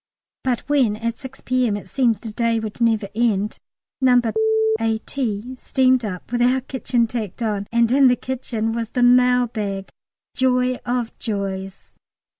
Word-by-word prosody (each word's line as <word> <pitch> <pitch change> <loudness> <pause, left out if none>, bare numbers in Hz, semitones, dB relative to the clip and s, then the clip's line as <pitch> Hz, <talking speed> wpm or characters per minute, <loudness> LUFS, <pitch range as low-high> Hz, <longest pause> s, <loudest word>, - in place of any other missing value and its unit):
But 250 -3 0
when 265 -8 +2
at 230 +1 -4
6 265 -1 -10
P.M. 250 -5 +1
it 205 - -10
seemed 240 -5 +1
the 220 -3 -7
day 230 0 +1
would 220 +1 -6
never 225 -3 +2
end, 215 -2 0 0.4
No. 250 -1 +5 0.6
A.T. 225 +1 -2
steamed 255 -1 +2
up 190 0 -6
with 240 0 0
our 255 +2 +3
kitchen 250 -2 0
tacked 225 -2 -5
on, 205 -2 -2
and 235 0 +3
in 270 +1 +6
the 250 - +4
kitchen 240 -4 -3
was 230 -1 -3
the 245 - 0
mail 250 0 +5
bag 200 -4 -4 0.5
joy 255 -1 +2
of 240 -1 -2
joys! 195 -3 -5
235 Hz, 155 wpm, -21 LUFS, 215-250 Hz, 0.6 s, in